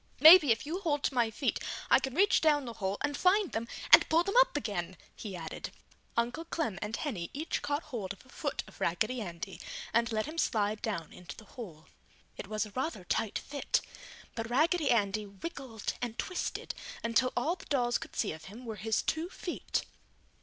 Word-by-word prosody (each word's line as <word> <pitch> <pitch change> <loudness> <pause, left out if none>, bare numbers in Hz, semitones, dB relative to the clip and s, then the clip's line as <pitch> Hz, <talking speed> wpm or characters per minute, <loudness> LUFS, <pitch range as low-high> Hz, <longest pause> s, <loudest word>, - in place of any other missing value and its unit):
"Maybe 310 -2 +10
if 225 - +1
you 330 +5 -3
hold 295 -7 0
to - - +1
my 240 -3 +3
feet, 260 +5 -1 0.3
I - - +8
can 265 -1 -4
reach 395 +4 +4
down 295 -3 +3
the 235 - -5
hole 195 -2 -2
and 290 -1 0
find 375 +3 +3
them 230 +1 -2 0.3
and - - +9
pull 330 +2 +4
them 395 - -2
up - - +4
again!" 190 -8 -3 0.2
he 200 -4 -6
added. 160 -2 -6 0.5
Uncle 240 +7 0
Clem 310 - -2
and 210 +2 -2
Henny 205 - -3
each 310 +4 -2
caught 290 +2 -1
hold 230 - -5
of 195 +5 -10
a - - -21
foot 285 +2 -3
of - - -16
Raggedy 220 +8 0
Andy 180 0 -6 0.3
and 235 0 +2
let 215 -1 0
him 315 +2 -5
slide 210 -4 +1
down 180 -8 -3
into 180 - -9
the 215 - -12
hole. 175 -11 -9 0.5
It - - -7
was 215 +1 -1
a 210 - -11
rather 260 - -3
tight 205 +4 0
fit, 285 0 -1 0.5
but 225 -1 -4
Raggedy 310 +4 +3
Andy 210 -2 +2
wiggled 225 - -5
and 235 -2 -3
twisted 365 - -3 0.3
until 230 +2 +2
all 310 +9 +1
the - - -14
dolls 245 -4 +1
could - - -10
see 215 - 0
of 155 0 -9
him 225 +8 -10
were 220 -2 -5
his 220 +3 0
two 320 +2 -1
feet. 355 - -3
235 Hz, 200 wpm, -31 LUFS, 210-295 Hz, 0.5 s, Maybe